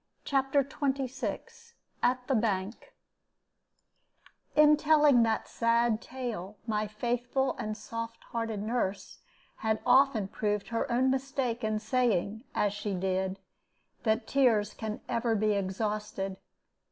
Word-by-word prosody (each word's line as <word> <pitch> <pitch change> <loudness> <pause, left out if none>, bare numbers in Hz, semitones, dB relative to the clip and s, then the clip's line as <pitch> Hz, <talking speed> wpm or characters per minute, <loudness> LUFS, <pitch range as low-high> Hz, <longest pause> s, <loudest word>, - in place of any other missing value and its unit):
CHAPTER 275 0 +2
XXVI 275 - -4 0.3
AT 250 0 +1
THE 270 - +1
BANK 210 -2 -1 1.6
In 300 0 +7
telling 295 -4 +5
that 225 -1 +1
sad 230 -1 +2
tale 225 -6 -5
my 215 -2 -1
faithful 245 +5 -1
and 215 0 -3
soft 230 +2 -6
hearted 225 -3 -2
nurse 215 -4 -2 0.4
had 220 -1 0
often 265 -7 +4
proved 210 0 -2
her 235 +2 -1
own 255 +2 +3
mistake 265 -3 -2
in 215 0 0
saying, 220 -1 0
as 205 -1 +1
she 205 -1 -3
did, 190 +1 -1 0.6
that 220 0 +1
tears 235 -7 +2
can 220 -1 -5
ever 230 -1 0
be 215 0 +2
exhausted. 200 0 -2
230 Hz, 115 wpm, -30 LUFS, 210-260 Hz, 1.6 s, In